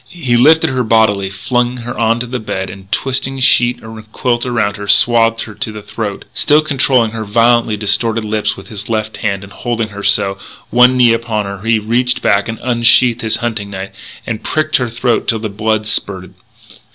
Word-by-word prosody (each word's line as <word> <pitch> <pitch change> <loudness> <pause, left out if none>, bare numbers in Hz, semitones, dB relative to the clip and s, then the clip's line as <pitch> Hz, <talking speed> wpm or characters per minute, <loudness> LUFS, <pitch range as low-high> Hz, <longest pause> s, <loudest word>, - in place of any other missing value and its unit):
He 135 -8 -2
lifted 155 +5 +4
her 130 -1 -1
bodily, 110 -4 +2
flung 120 +5 -2
her 120 0 -6
onto 115 +1 0
the 125 +1 -5
bed, 95 -3 -4
and, 95 +1 -14
twisting 135 +1 -1
sheet 125 -1 +3
and 110 -1 -11
quilt 120 +1 -1
around 115 -5 -1
her, 100 0 -7
swathed 115 +1 +4
her 110 - -10
to 110 +2 -5
the 105 -1 -9
throat. 105 -1 -5
Still 150 +1 +3
controlling 130 -6 +1
her 110 -1 -5
violently 115 +1 +2
distorted 110 +2 0
lips 105 0 -1
with - - -12
his 105 -2 -8
left 110 -1 -2
hand 100 -2 -2
and 100 0 -13
holding 115 0 -3
her 100 -1 -8
so, 100 -1 +2 0.3
one 125 +1 +5
knee 120 -2 +5
upon 115 -2 -2
her, 100 -1 -7
he 115 +1 +1
reached 120 +3 -1
back, 100 +3 +1
unsheathed 120 +1 +2
his 110 -1 0
hunting 110 -4 -3
knife, 95 -1 -7 0.3
and 110 -2 -4
pricked 155 0 0
her 125 -2 -2
throat 120 +1 -1
till 115 - +1
the 110 0 -5
blood 110 +1 -1
spurted. 95 -3 -2
115 Hz, 190 wpm, -14 LUFS, 105-120 Hz, 0.3 s, one